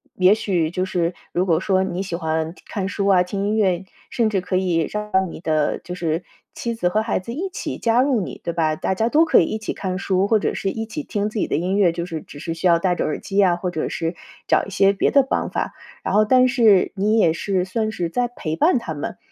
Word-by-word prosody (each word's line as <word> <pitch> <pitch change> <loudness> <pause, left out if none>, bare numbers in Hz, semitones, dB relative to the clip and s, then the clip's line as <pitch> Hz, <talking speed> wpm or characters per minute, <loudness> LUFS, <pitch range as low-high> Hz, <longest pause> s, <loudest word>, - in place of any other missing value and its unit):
也 185 +3 +5
许 175 -7 0
就 185 +1 -1
是 175 -2 -1 0.2
如 180 +2 0
果 165 -3 +3
说 190 -1 +2
你 185 0 -3
喜 175 -3 -4
欢 160 -1 -2
看 195 -3 -3
书 200 -1 -1
啊， 185 -2 +5
听 200 +2 -3
音 215 - 0
乐， 190 -3 +1 0.2
甚 230 -3 +1
至 195 -3 0
可 185 0 -1
以 175 -4 +1
让 210 0 -4 0.2
你 - - -9
的， 155 -2 0
就 180 - -7
是 165 -1 -2 0.3
妻 235 -1 -3
子 180 -6 0
和 215 +4 +1
孩 220 -3 -1
子 230 +6 -7
一 370 +7 -3
起 375 - -5
加 235 +1 +2
入 265 -4 +2
你， 185 - -6
对 170 - -2
吧？ 160 -2 +1
大 190 - -1
家 225 +4 0
都 310 +6 +4
可 325 - +5
以 165 - +3
一 215 - -3
起 215 - -4
看 185 -1 -3
书， 190 0 +1
或 220 +1 +4
者 - - -1
是 195 - -2
一 225 +2 -4
起 225 +7 -5
听 210 -4 -2
自 215 - -4
己 - - 0
的 - - -1
音 180 +5 0
乐， 180 -5 +4
就 170 0 -3
是 160 -3 -5
只 145 - -12
是 165 - -4
需 165 +2 0
要 170 - +5
戴 180 +1 +1
着 - - -1
耳 150 - -2
机 200 0 +1
啊， 180 -3 +4
或 180 0 -3
者 160 - -2
是 165 +1 -3 0.3
找 - - +3
一 - - -9
些 195 0 +4
别 200 - +1
的 275 -2 +5
方 270 - -1
法， - - -3 0.3
然 - - -2
后 215 +1 +5
但 255 +3 +5
是 225 -7 +4
你 210 +3 +2
也 170 -7 +4
是 185 +2 -1
算 215 +4 -2
是 175 -6 -3
在 245 +7 0
陪 160 -9 -4
伴 320 - +3
他 165 -9 -5
们， 145 - -5
190 Hz, 285 characters per minute, -21 LUFS, 175-215 Hz, 0.3 s, 也